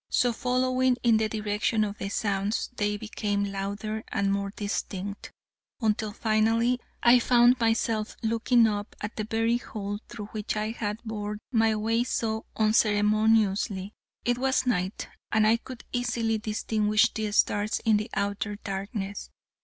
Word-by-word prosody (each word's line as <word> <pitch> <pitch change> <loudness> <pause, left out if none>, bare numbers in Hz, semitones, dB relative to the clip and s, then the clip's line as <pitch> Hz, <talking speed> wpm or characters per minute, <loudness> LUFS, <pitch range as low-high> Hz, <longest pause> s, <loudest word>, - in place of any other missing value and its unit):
So, 245 -1 +2
following 255 +1 +1
in 230 -2 +5
the 220 0 0
direction 215 +1 0
of 205 0 -4
the 195 - -3
sounds, 200 +2 -1
they 210 -1 0
became 205 -1 -2
louder 205 +3 -4
and 200 0 0
more 200 0 -1
distinct, 200 -1 -4 0.5
until 215 -2 0
finally 225 +3 +2 0.2
I 245 +1 +7
found 245 +1 +5
myself 225 -1 0
looking 230 +1 +3
up 205 -1 -2
at 210 +2 -5
the 215 - -3
very 225 +2 +1
hole 205 -3 -5
through 220 -3 -7
which 215 -1 -3
I 215 +1 -1
had 210 -2 -3
bored 210 -2 -4
my 225 -2 +3
way 225 +2 +1
so 220 -3 -2
unceremoniously. 215 -2 +2 0.3
It 245 0 +1
was 265 0 +1
night, 195 -5 -1 0.2
and 220 -1 +3
I 220 +2 +5
could 245 +1 -10
easily 235 -2 0
distinguish 215 0 +1
the 215 -1 -2
stars 205 +1 +2
in 220 -2 +5
the 210 +1 -3
outer 205 +1 -1
darkness. 200 0 -5
215 Hz, 145 wpm, -27 LUFS, 205-230 Hz, 0.5 s, I